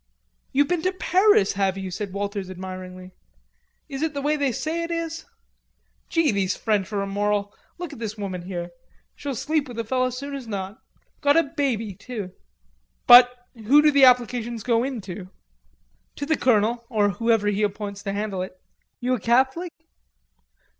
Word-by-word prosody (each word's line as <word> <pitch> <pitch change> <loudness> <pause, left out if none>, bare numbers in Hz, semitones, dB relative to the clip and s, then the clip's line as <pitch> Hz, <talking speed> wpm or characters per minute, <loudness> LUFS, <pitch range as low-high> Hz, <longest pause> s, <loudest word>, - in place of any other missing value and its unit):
"You've 285 +1 +3
been 350 0 0
to 370 +2 0
Paris, 370 - +3
have 195 -1 0
you?" 190 -1 -5
said 200 +1 -4
Walters 200 -1 -4
admiringly. 185 0 -8 0.8
"Is 275 -2 -6
it 315 -2 -1
the 280 - -2
way 300 +1 +2
they 285 -3 0
say 320 +7 -2
it 335 - -4
is? 330 -1 -4 0.8
Gee, 330 -4 +2
these 195 -2 0
French 210 -3 0
are 200 -1 -1
immoral. 205 +1 -1 0.2
Look 350 -4 -6
at 265 - -10
this 220 -2 -5
woman 190 -3 -4
here. 175 -1 -5 0.4
She'll 280 -2 -5
sleep 305 +4 -1
with 245 -2 -9
a 230 - -1
feller 255 +3 0
soon 280 +3 -6
as 270 -4 -6
not. 195 -1 -5 0.4
Got 285 +2 +4
a 330 - +5
baby 265 -9 -2
too!" 210 -2 -7 0.7
"But 245 0 +10 0.2
who 235 +5 +4
do 305 - +6
the 280 -2 +7
applications 240 -2 +2
go 235 -1 +2
in 260 -4 -3
to?" 185 -1 -8 0.9
"To 285 - -4
the 315 +2 +2
colonel, 235 -2 +2
or 210 -4 +2
whoever 225 +2 +1
he 205 0 -1
appoints 205 -1 -3
to 200 - -3
handle 200 -2 -3
it. 185 0 -7 0.4
You 250 +1 +1
a 250 - 0
Catholic?" 265 - +1
230 Hz, 175 wpm, -24 LUFS, 200-280 Hz, 0.9 s, But